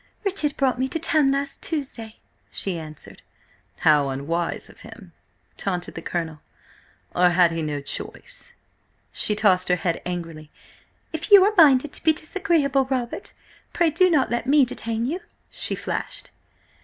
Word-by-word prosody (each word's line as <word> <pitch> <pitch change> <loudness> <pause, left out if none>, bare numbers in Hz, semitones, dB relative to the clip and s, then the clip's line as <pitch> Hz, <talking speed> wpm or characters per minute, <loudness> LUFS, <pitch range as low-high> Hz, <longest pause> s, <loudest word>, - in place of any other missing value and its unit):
"Richard 365 -7 0
brought 260 -3 +1
me 260 - +1
to 295 - -2
town 310 -3 +2
last 275 0 -2
Tuesday," 260 -8 -4 0.3
she 185 -4 -1
answered. 155 -2 -10 0.6
"How 150 -3 +4
unwise 160 +6 -2
of - - -17
him!" 210 -6 -13 0.5
taunted 180 -3 -3
the - - -7
Colonel. 160 -3 -4 0.7
"Or 180 0 +4
had 175 -1 +4
he 165 0 -2
no 150 -2 -3
choice?" 485 - -7 0.6
She 210 - 0
tossed 190 -4 +2
her 180 - +4
head 170 -1 -2
angrily. 165 -4 -6 0.6
"If 320 +4 -3
you 400 -2 +9
are 415 +2 +3
minded 290 -5 +5
to - - -7
be 320 - +5
disagreeable, 310 -5 0
Robert, 255 -3 -3 0.4
pray 335 -2 +2
do 365 +4 +4
not 295 -8 +2
let 240 0 -1
me 285 0 +5
detain 230 -1 -3
you!" 320 +8 -2 0.3
she - - -1
flashed. - - -5
240 Hz, 155 wpm, -23 LUFS, -, 0.7 s, you